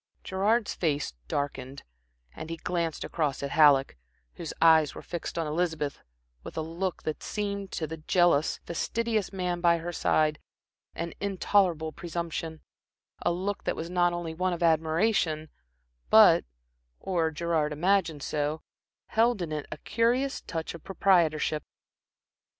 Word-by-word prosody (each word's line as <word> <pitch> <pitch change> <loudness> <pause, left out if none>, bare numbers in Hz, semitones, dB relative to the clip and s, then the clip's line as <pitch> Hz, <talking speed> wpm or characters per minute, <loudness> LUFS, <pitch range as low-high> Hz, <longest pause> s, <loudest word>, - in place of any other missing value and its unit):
Gerard's 205 +4 +1
face 145 - -1
darkened, 135 - -4 0.5
and 160 - -7
he 165 - -4
glanced 170 -2 -2
across 145 -4 -2
at 140 - -3
Halleck, 145 - +5 0.4
whose 165 - -6
eyes 160 -3 +5
were - - -8
fixed 170 -1 -5
on 165 - 0
Elizabeth 155 -2 -2 0.4
with - - -9
a - - 0
look 170 +3 -3
that 155 - -3
seemed, 200 -2 -3
to 160 - -2
the 160 +1 -6
jealous, 160 -1 +2
fastidious 220 +4 -1
man 180 -2 -2
by 170 -1 +4
her 170 +1 -5
side, 155 -2 +2 0.6
an 170 0 -4
intolerable 185 -5 +1
presumption; 165 -1 -5 0.6
a - - +1
look 190 +4 -3
that - - 0
was 165 +2 -5
not 175 -1 +3
only 175 -2 -4
one 180 +2 0
of 175 0 -3
admiration, 160 0 +2 0.6
but, - - +7 0.5
or 170 -4 0
Gerard 160 -1 0
imagined 165 -2 +1
so, 150 +2 -2 0.5
held 230 0 +3
in 170 -3 -4
it 150 -1 -4
a - - -5
curious 245 +4 0
touch 165 -2 -5
of 170 - -11
proprietorship. 165 -6 +2
165 Hz, 140 wpm, -28 LUFS, 155-185 Hz, 0.6 s, but